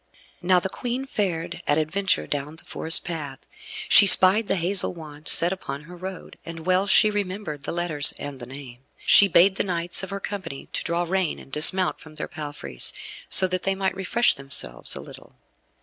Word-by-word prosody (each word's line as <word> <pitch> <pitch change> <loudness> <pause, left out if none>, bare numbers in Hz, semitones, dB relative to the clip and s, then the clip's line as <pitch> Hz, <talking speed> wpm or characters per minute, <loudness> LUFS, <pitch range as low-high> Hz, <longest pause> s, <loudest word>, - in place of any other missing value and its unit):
Now 180 0 +2
the 185 - -4
Queen 245 +6 -5
fared 185 -10 -4
at 145 - +1
adventure 160 - -1
down 145 - -5
the 160 - -15
forest 160 - +3
path. 150 -6 -7 0.5
She 200 - +7
spied 195 +3 +6
the - - 0
hazel 180 +1 +1
wand 155 -2 -13
set 175 +2 +5
upon 145 -6 -8
her 175 +3 -13
road, 185 +1 -10
and 165 -1 -10
well 185 +2 +1
she 215 +2 +4
remembered 185 -7 -6
the - - -4
letters 170 -4 +1
and 145 -2 -9
the 120 - -10
name. 130 -2 -12 0.2
She 200 - +5
bade 190 +2 +3
the - - -1
knights 175 -2 -1
of 190 - -8
her 200 0 -6
company 185 -9 -8
to - - -3
draw 170 +1 -2
rein, 185 -1 -2
and 135 - -15
dismount 180 +6 +4
from 155 -1 -16
their - - -6
palfreys, 145 - -3 0.4
so 190 - +6
that 185 0 -2
they 195 0 -1
might 190 -1 -2
refresh 230 +5 +1
themselves 135 - -3
a - - -8
little. - - -15
175 Hz, 195 wpm, -23 LUFS, 150-190 Hz, 0.5 s, She